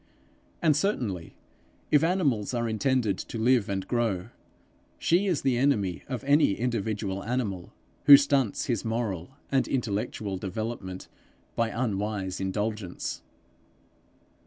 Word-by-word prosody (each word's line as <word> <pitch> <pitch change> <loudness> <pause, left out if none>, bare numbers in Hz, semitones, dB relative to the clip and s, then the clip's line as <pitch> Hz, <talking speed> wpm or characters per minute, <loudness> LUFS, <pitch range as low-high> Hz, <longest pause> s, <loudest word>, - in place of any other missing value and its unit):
And 155 -3 +5
certainly, 120 - -1 0.6
if 150 0 +5
animals 145 - +1
are 120 -1 0
intended 110 -2 +1
to - - -6
live 115 -2 +3
and 95 -1 -2
grow, 110 -7 -1 0.7
she 180 +4 +2
is 175 -7 0
the 125 -3 +2
enemy 105 -11 +1
of 130 -1 -4
any 140 -6 +4
individual 105 -4 -2
animal, 105 -7 -3 0.3
who 140 - +12
stunts 140 -5 +1
his 120 -5 -1
moral 115 -2 -3 0.2
and 135 -1 +2
intellectual 105 -4 -2
development 95 -1 -5 0.5
by 115 -1 +1
unwise 105 -5 -2
indulgence. 105 -1 -3
115 Hz, 115 wpm, -27 LUFS, 100-130 Hz, 0.7 s, who